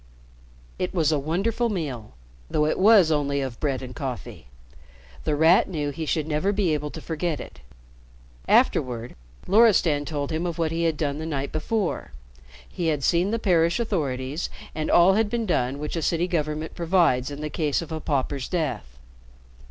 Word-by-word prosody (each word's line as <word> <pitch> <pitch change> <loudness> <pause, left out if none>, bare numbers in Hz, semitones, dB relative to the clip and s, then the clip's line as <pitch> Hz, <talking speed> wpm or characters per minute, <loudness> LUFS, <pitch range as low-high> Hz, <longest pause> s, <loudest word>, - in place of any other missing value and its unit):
It 180 +1 -2
was 160 -3 +2
a 150 - +1
wonderful 195 - 0
meal, 140 - -4 0.4
though 150 - +1
it 155 - 0
was 195 -4 +6
only 140 -2 +1
of 130 -4 -4
bread 135 -3 -1
and 125 -1 -8
coffee. 125 - -6 0.8
The 150 - +1
Rat 160 +5 +4
knew 150 -4 -2
he 160 +2 -5
should 155 -1 0
never 155 +6 0
be 195 -5 +1
able 150 0 -2
to 160 - -8
forget 160 -2 -2
it. - - -10 0.9
Afterward, 120 -2 +2 0.3
Loristan 180 -8 +4
told 145 -2 -3
him 165 +3 -1
of 170 - -4
what 165 -2 0
he 165 +1 -1
had 160 -2 0
done 145 -1 -2
the 160 - -4
night 140 -3 -3
before. 180 - -2 0.5
He 175 - -3
had 150 -3 0
seen 175 +5 +2
the 230 - 0
parish 170 -3 +2
authorities 145 - -2 0.2
and 155 0 -3
all 175 +3 +6
had 215 +1 +1
been 235 0 -1
done 135 -8 0
which 150 +3 -4
a 165 - -1
city 170 +3 0
government 155 -2 -2
provides 165 -7 +2
in 145 +1 -7
the 150 0 -4
case 155 0 0
of 165 - -11
a 160 - -3
pauper's 140 -2 -2
death. 145 - -3
155 Hz, 180 wpm, -25 LUFS, 145-175 Hz, 0.9 s, was